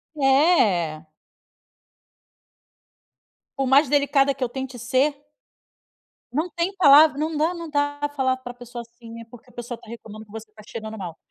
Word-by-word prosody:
É. 265 - +2 2.5
Por 270 -1 0
mais 280 +3 +5
delicada 280 -1 +2
que 270 0 -5
eu 250 - -1
tente 265 0 -6
ser 265 +5 +1 1.2
não 315 +6 -1
tem 345 +4 -3
palavra 300 -4 +7
não 310 +1 -2
dá 320 +4 +1
não 335 -2 -7
dá 290 0 -1
falar 260 -2 +1
pra 245 -1 -9
pessoa 245 0 -9
assim, 235 0 -15
né. 230 0 -9
Porque 245 +1 -16
a - - -22
pessoa 240 0 -6
está 235 - -19
reclamando 220 -2 -10
que 210 - -21
você 220 0 -9
está 215 0 -16
chegando 220 -1 -7
mal. 175 -5 -7
260 Hz, 160 wpm, -23 LUFS, 230-290 Hz, 2.5 s, palavra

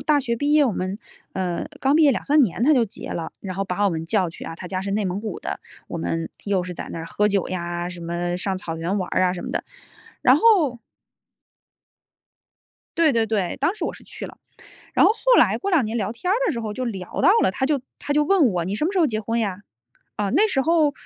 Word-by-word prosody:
大 300 -2 +2
学 235 -3 -1
毕 285 +5 0
业 300 -1 +6
我 245 - +1
们 185 +2 -3 0.3
呃， 180 -2 -2
刚 270 +2 +3
毕 320 - +5
业 290 - +6
2-3 290 +3 +3
年 225 -1 0
他 300 +3 +5
就 245 - +4
结 210 - -9
了。 165 - -4
然 185 -2 -5
后 195 - -1
把 195 +2 -1
我 200 - +3
们 160 -1 -3
叫 185 +1 +1
去 165 - -10
啊， 165 - -6
他 180 - -8
家 185 -1 -3
是 200 - -4
内 205 +1 0
蒙 185 +2 -2
古 215 -4 -5
的， - - -5 0.3
我 - - -5
们 165 0 -2 0.2
又 195 -3 +1
是 180 -1 -6
在 - - -7
那 - - -5
儿 165 - -6
喝 210 +4 +1
酒 200 -3 0
呀， 175 -1 -3
什 180 -1 -8
么 175 +1 -2
上 190 +1 -2
草 165 -3 -5
原 175 +5 -1
玩 185 - -3
儿 - - +2
啊 180 -1 +3
什 180 - -6
么 - - -5
的。 - - -2 0.6
然 - - +6
后 355 - +4 2.2
对 325 -3 +5
对 230 -1 +2
对， 205 -5 -1
当 320 +9 +1
时 - - -3
我 - - -3
是 - - -15
去 - - -8
了。 - - -13 0.6
然 - - +6
后 - - +6
后 - - +3
来 - - +3
过 395 - -2
2 325 - +3
年 220 +2 -4
聊 210 -1 -1
天 360 +11 -2
儿 - - +3
的 - - +2
时 240 - -3
候 215 -2 -4
就 255 - -4
聊 195 -7 -4
到 - - +6
了， - - +3
他 235 - -4
就 285 +1 +2 0.2
他 - - -4
就 300 +1 +3
问 345 -3 +4
我：” 180 -6 -1
你 190 - -3
什 300 - 0
么 355 - 0
时 395 - -2
候 345 - +5
结 220 -6 -1
婚 230 +2 -1
呀？ 200 -4 -2 0.6
“啊， 205 -1 -1
那 420 +5 +5
时 285 -10 +1
候 315 0 +3
210 Hz, 275 characters per minute, -23 LUFS, 180-285 Hz, 2.2 s, 业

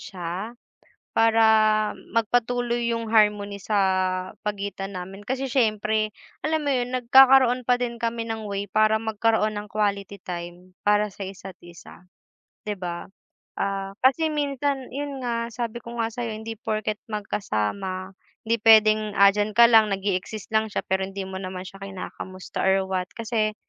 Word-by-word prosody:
siya, 185 +5 -6 0.6
para 225 0 +4 0.7
magpatuloy 240 +1 +1
'yong 230 -1 -3
harmony 210 -2 +3
sa 210 +3 -1 0.7
pagitan 200 -1 -4
namin. 190 +3 -8
Kasi 265 +1 -2
siyempre, 215 -3 +1 0.3
alam 315 0 0
mo 285 - +1
'yon, 250 -1 -1
nagkakaroon 255 0 +6
pa 250 - +5
din 235 -1 -2
kami 230 0 -1
ng 220 -1 -4
way 200 0 -3
para 215 +1 +4
magkaroon 220 0 +1
ng 210 - -8
quality 200 -2 -1
time 175 +1 -7 0.2
para 210 0 +3
sa 195 - -7
isa't 190 0 -10
isa, 175 +1 -14 0.6
'di 210 - -1
ba. 175 -1 -5 0.5
Ah, 195 0 -2
kasi 315 +5 +4
minsan, 280 -2 -1
'yon 280 -1 -4
nga, 235 -1 -1
sabi 235 0 -4
ko 235 0 -8
nga 225 - +1
sa'yo, 240 -2 -3
hindi 220 +1 -6
porke't 215 0 -3
magkasama, 190 - -3 0.3
hindi 230 +1 +1
puwedeng 215 -1 +5
andiyan 205 +2 +4
ka 235 - +9
lang, 220 -2 +6
nag-e-exist 195 +1 -3
lang 220 0 +2
siya, - - -1
pero 190 0 0
hindi 195 +1 -6
mo 190 0 -6
naman 185 -1 -5
siya 195 +1 -11
kinakamusta 185 -1 -7
or 190 0 +2
what. 185 -1 -1
Kasi, 220 -2 -1
215 Hz, 150 wpm, -24 LUFS, 195-235 Hz, 0.7 s, ka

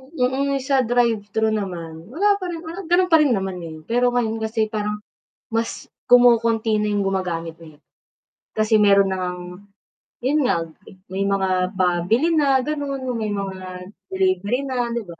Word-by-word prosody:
hmm, 270 +2 0
mm, 270 - -3
sa 270 0 +2
drive-thru 220 -3 +1
naman, 170 -5 -5
wala 400 - +1
pa 370 - -5
rin, 340 -1 -6
wala 335 +4 -7
ganu'n 360 +1 +3
pa 325 - +7
rin 280 -6 +3
naman 190 -2 -3
ngayon 160 -2 -9
pero 245 +7 +1
ngayon 225 -2 0
kasi 220 0 -1
parang, 210 -1 -3 0.5
mas 230 0 -3 0.2
kumokonti 230 -3 +4
na 210 0 0
yung 205 - +1
gumagamit 170 -4 -3
eh. 155 -2 -16 0.8
Kasi 215 0 +3
meron 200 -1 +4
na 185 - -2
ngang, 180 +2 -6 0.6
'yun 290 +4 +2
nga, - - +2 0.6
may 195 +1 -1
mga 190 -1 0
pabili 185 - +2
na 275 -5 +3
gano'n 285 -2 -3
may 220 -3 -2
mga 195 -1 -4 0.5
delivery 190 +5 0
na, 250 -3 -1
di 235 - -2
ba? 170 -3 -12
220 Hz, 160 wpm, -22 LUFS, 190-255 Hz, 0.8 s, pa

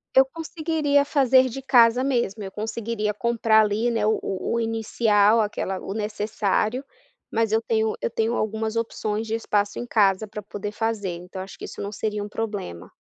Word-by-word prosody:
Eu 265 0 +8
conseguiria 310 -1 0
fazer 260 -3 +4
de 270 +3 -6
casa 245 -2 +5
mesmo, 235 -6 0
eu 190 - -6
conseguiria 220 0 -3
comprar 225 0 +3
ali, 215 +3 +1
né, 225 -2 0
o 220 - +2
o 190 - -3 0.2
o - - +1
inicial, 225 -1 +2
aquela 205 -3 -1
o 195 - -6
necessário, 215 +3 -1 0.5
mas 225 -1 +1
eu 220 +1 +3
tenho 220 -1 0
eu - - 0
tenho 225 +1 0
algumas 220 0 -2
opções 220 -1 -2
de 225 - -1
espaço 205 -2 0
em 240 - -3
casa 210 -3 +2
para 210 0 -7
poder 205 0 -6
fazer 220 -2 -2
então 180 +2 -8
acho 190 +1 -9
que - - -6
isso - - -9
não 200 - -4
seria 210 0 -3
um 205 - -7
problema. 205 - -5
220 Hz, 185 wpm, -24 LUFS, 205-235 Hz, 0.5 s, Eu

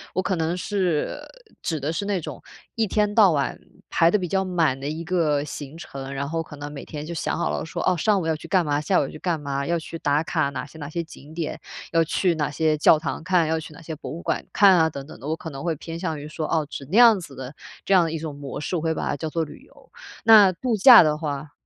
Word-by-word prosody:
“我 185 - +2
可 190 0 -1
能 165 +2 -1
是 185 -5 -1 0.4
指 160 -3 -2
的 150 +4 -2
是 200 +4 -3
那 200 -2 0
种 165 - -8 0.3
一 225 -2 +1
天 210 +1 +1
到 205 -5 +6
晚 140 -3 -1 0.3
排 165 0 +4
得 210 - +3
比 180 - -3
较 190 +2 0
满 165 -7 +1
的 140 - -4
一 160 +2 -4
个 160 -5 +1
行 145 +1 -8
程， 135 -5 -8
然 140 +1 -3
后 165 +2 -2
可 155 -2 -10
能 145 0 -7
每 145 -2 -8
天 150 -1 -7
就 170 - -6
想 165 - -2
好 - - -1
了 - - -3
说， 160 - -5
哦， 185 - +4
上 200 +4 +2
午 175 - -3
要 160 -1 +1
去 150 - -10
干 185 -4 +2
嘛， 145 0 0
下 185 +4 +1
午 - - +2
要 - - -3
去 155 - -10
干 170 -2 -1
嘛， 140 -1 -3
要 170 - +1
去 165 0 -7
打 145 +2 +1
卡 155 -4 0
哪 130 -2 -5
些 160 +2 -14
哪 145 - -6
些 170 +2 -3
景 155 -2 -14
点， 160 -1 -4 0.3
要 165 -1 +4
去 175 +3 +1
哪 150 -2 -1
些 155 +1 +1
教 150 +1 +6
堂 160 - -4
看， 175 -3 +2
要 160 - +1
去 155 -1 -10
哪 160 - -13
些 160 0 -6
博 155 - -8
物 165 - -6
馆 - - -2
看 195 -3 +6
啊 160 -1 +4
等 140 -3 -8
等 - - -11
的。 140 - -7
我 160 - 0
可 165 - -7
能 135 -1 -8
会 170 -2 0
偏 165 +3 -7
向 160 -4 -3
于 145 - -8
说， 155 +1 -4
哦， 160 -2 0
指 140 - -7
那 215 - +2
样 230 -4 +8
子 165 -6 -10
的 130 +2 -7 0.3
这 195 - +2
样 180 -2 +6
的 165 - -2
一 165 - -2
种 150 -2 -6
模 140 0 -7
式， 180 - -3
我 165 - -1
会 160 0 0
把 - - -3
它 - - -1
叫 155 +3 -4
做 165 +1 -1
旅 145 - -12
游。 - - -21 0.4
那 215 -4 +8
度 235 +6 -1
假 240 +4 +10
的 150 -1 +1
话 145 -1 -4
160 Hz, 305 characters per minute, -24 LUFS, 150-180 Hz, 0.4 s, 假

